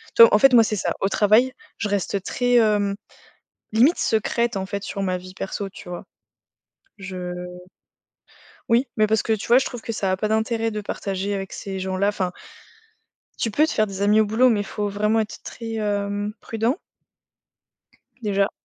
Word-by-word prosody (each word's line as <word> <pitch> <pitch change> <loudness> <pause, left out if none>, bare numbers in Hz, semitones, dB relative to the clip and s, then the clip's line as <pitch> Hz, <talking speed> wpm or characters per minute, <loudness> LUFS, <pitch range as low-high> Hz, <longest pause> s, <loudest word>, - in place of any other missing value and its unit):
tu - - +6
vois? 230 - +9
En - - +7
fait, 270 +3 +6
moi, 235 -2 +8
c'est 215 0 -1
ça. - - -1
Au 195 - +2
travail, 220 +6 +4 0.2
je 210 - -2
reste 200 -1 -1
très, 245 +3 0
hem, 210 -3 +3 0.8
limite 255 +10 +5
secrète, 230 +1 0
en 190 - -3
fait, 200 +1 -5
sur 200 0 -4
ma 185 -1 0
vie 185 +1 -11
perso, 195 +1 -4
tu 185 - -13
vois? 175 - -7 0.9
Je 185 -2 -6 1.4
Oui, 235 +4 +3
mais 215 -1 +4
parce 220 0 +1
que 225 - 0
tu 215 -1 -2
vois, 240 - +7
je 265 - 0
trouve 245 -3 -6
que 230 - -4
ça 195 -3 -1
a - - +1
pas 215 +3 -1
d'intérêt 225 +1 0
de 210 -1 -4
partager 200 -1 -3
avec 195 -1 -5
ces 195 -1 -5
gens-là. 190 +1 0
Enfin 185 -3 -1 1.1
tu 225 - 0
peux 300 +9 +3
te - - -3
faire 215 - +2
des 195 -1 -5
amis 210 +2 +4
au 215 - +3
boulot, 225 +5 +4
mais 220 -4 +2
il - - -2
faut 205 +1 -3
vraiment 210 +2 +1
être 215 - -5
très, 225 -1 -7
hem, 205 -1 -2
prudent 225 +5 -1 1.4
déjà. 200 -3 +1
210 Hz, 195 wpm, -23 LUFS, 195-225 Hz, 1.4 s, vois